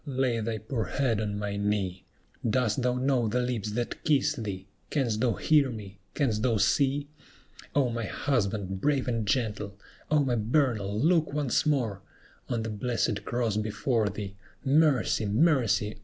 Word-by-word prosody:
lay 130 -3 0
thy 110 0 -2
poor 110 +1 -3
head 120 -6 0
on 105 -1 -2
my 105 -1 -3
knee; 100 -3 -1 0.5
Dost 115 0 +1
thou 125 0 +1
know 125 -2 +1
the 120 +4 0
lips 120 -4 -2
that 120 +1 -3
kiss 150 -1 +3
thee? 100 -8 -5 0.2
Canst 120 -7 0
thou 120 -3 +3
hear 150 -4 +3
me? 100 -4 -8 0.2
canst 115 -8 +1
thou 115 -2 +2
see? 140 +6 +2 0.7
O 140 -3 +4
my 115 -1 -2
husband, 100 -6 -1
brave 140 -1 +1
and 115 -4 -1
gentle! 105 -3 -1 0.3
O 150 -1 +4
my 130 - +1
Bernal, 110 -3 +1
look 160 +2 +3
once 145 0 +1
more 120 -10 0 0.5
On 115 -2 -1
the 110 - -3
blessed 110 -1 -1
cross 120 -3 0
before 110 +1 0
thee! 100 0 -6 0.3
Mercy! 140 -6 +3
mercy! 110 - +2
115 Hz, 155 wpm, -28 LUFS, 105-135 Hz, 0.7 s, O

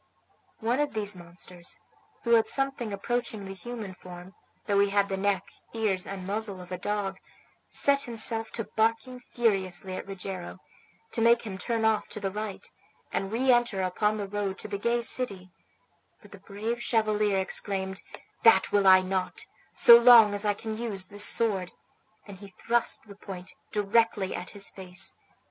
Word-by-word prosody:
One 235 +4 0
of 295 -5 -1
these 205 -2 +1
monsters, 175 0 -9 0.4
who 235 - -1
had 225 -1 +5
something 270 -3 -1
approaching 215 0 -3
the 195 - -7
human 215 0 -7
form, 180 +1 -12 0.3
though 200 -1 +2
he 200 0 +3
had 200 0 +1
the 195 - -1
neck, 195 -1 0 0.3
ears, 205 -5 0
and 195 -2 -6
muzzle 205 -1 -3
of 180 0 -12
a 180 - -3
dog, 195 -1 -3 0.5
set 280 0 +3
himself 225 -2 +1
to 230 - -3
bark 225 +2 +1 0.3
furiously 190 -5 0
at - - -7
Rogero, 190 -2 -6 0.5
to 230 - -2
make 235 +1 +4
him 205 -4 -6
turn 230 -1 -1
off 220 -1 +2
to - - -7
the 195 -2 -3
right, 210 0 -5 0.4
and 195 0 -2
reenter 240 -4 +2
upon 210 +4 0
the 205 -1 -4
road 200 -1 -3
to - - -6
the 200 -1 -4
gay 235 +2 0
city; 200 -7 0 0.7
but - - -18
the - - -12
brave 220 +4 -4
chevalier 215 -3 +1
exclaimed, 190 0 -2 0.4
"That 225 -1 +5
will 200 -1 +3
I 185 0 +8
not, 185 0 -3 0.3
so 235 0 +8
long 235 -3 +8
as 205 +1 0
I 205 -1 +2
can 220 +1 -6
use 205 -6 -2
this 205 0 +1
sword," 195 -6 +1 0.5
and 200 -3 -11
he 200 - -10
thrust 230 +5 -1
the 205 -2 -13
point 190 -2 -9 0.2
directly 210 -1 +1
at 180 - -5
his 200 -1 -4
face. 180 -2 -4
205 Hz, 170 wpm, -28 LUFS, 190-225 Hz, 0.7 s, I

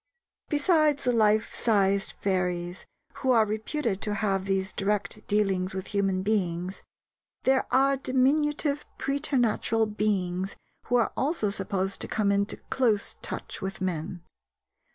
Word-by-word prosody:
Besides 300 -1 +3
the 250 - +2
life 215 -1 +3
sized 200 -3 +2
fairies 180 -2 -1 0.3
who 265 - -2
are 230 -3 +5
reputed 220 0 -2
to 210 -1 -2
have 195 -2 0
these 190 -1 -1
direct 205 +1 -2
dealings 190 -3 +1
with 190 - -5
human 195 -2 +1
beings, 185 -3 -1 0.6
there 265 0 +2
are 275 +1 +3
diminutive 285 +3 +1
preternatural 245 -5 +1
beings 195 -3 -1 0.3
who 245 - +1
are 235 -2 +3
also 270 -8 0
supposed 195 -1 -2
to - - -2
come 205 -2 +1
into 200 +1 0
close 225 -6 +1
touch - - -6
with 190 0 -4
men. 175 -1 -3
210 Hz, 130 wpm, -27 LUFS, 190-255 Hz, 0.6 s, are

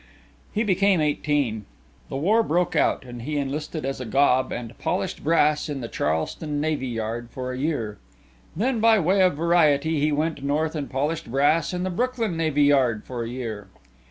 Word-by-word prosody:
He 215 - 0
became 195 -2 +3
eighteen. 145 -7 0 0.4
The - - -5
war 205 +11 +3
broke 175 -3 0
out - - +2
and 120 -1 -8
he 150 +5 -3
enlisted 150 +2 -3
as 135 -1 -3
a - - -4
gob 130 +2 +2
and 120 -1 -6
polished - - -2
brass 150 -1 +2
in 140 -2 -4
the 115 - -4
Charleston 115 - -2
Navy 150 -3 -1
yard 115 0 -4
for 130 +1 -5
a 125 - -5
year. 130 -8 -2 0.6
Then, 235 +6 0
by 225 0 +5
way 190 +1 +2
of 185 -5 +4
variety, 160 -2 +3
he 150 +1 +2
went 150 -1 -1
North 150 +3 0
and 150 -4 -4
polished 145 +1 -2
brass 145 +4 +2
in 180 0 -3
the 185 - -2
Brooklyn 235 -1 -1
Navy 155 -3 +1
yard 130 -6 +3
for 120 -2 -4
a 115 - -5
year. 115 -5 -5
150 Hz, 185 wpm, -24 LUFS, 130-165 Hz, 0.6 s, by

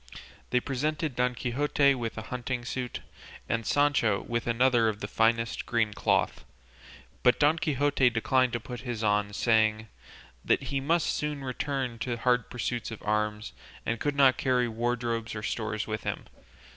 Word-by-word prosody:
They 125 - +3
presented 145 +2 -2
Don 125 0 +1
Quixote 140 +3 +2
with 120 -4 -4
a 110 - -4
hunting 125 +1 -4
suit, 125 -2 -4 0.5
and 115 -1 -1
Sancho 145 -8 +2
with 120 0 -3
another 120 -1 +3
of 105 -1 -4
the 100 - -4
finest 115 +1 +1
green 115 -3 +1
cloth; - - 0 0.8
but 125 - +4
Don 150 +3 +4
Quixote 145 -4 +2
declined 125 +2 +1
to 120 - 0
put 120 +2 -7
his 120 -3 -4
on, 105 -1 +2
saying 110 0 +2 0.5
that - - +2
he 135 +1 -2
must 160 +4 +1
soon 150 -2 -3
return 130 -2 -3
to 125 - -3
the 120 - -1
hard 125 0 +1
pursuit 120 -1 -3
of 115 - -9
arms, 105 0 -1 0.3
and 115 0 -1
could 145 -1 -1
not 135 -2 +5
carry 125 -2 +2
wardrobes 115 0 -2
or 105 - -5
stores 110 -1 -2
with 110 -1 -4
him. - - -3
120 Hz, 165 wpm, -28 LUFS, 115-135 Hz, 0.8 s, not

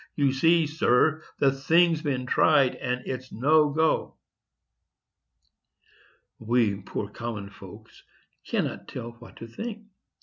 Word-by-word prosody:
You 140 -2 +2
see, 165 +4 +3
sir, 155 0 +2 0.2
the 140 -1 +3
thing's 160 +4 +2
been 135 -5 -2
tried, 130 +1 +3
and 125 0 -4
it's 130 0 -6
no 150 +6 +3
go." 160 +2 0 2.2
We 115 -2 +1
poor 100 +2 -5
common 105 -3 -7
folks - - -14 0.4
cannot - - -3
tell 115 - -7
what 120 - -14
to - - -9
think. 215 - -7
135 Hz, 115 wpm, -26 LUFS, 120-155 Hz, 2.2 s, see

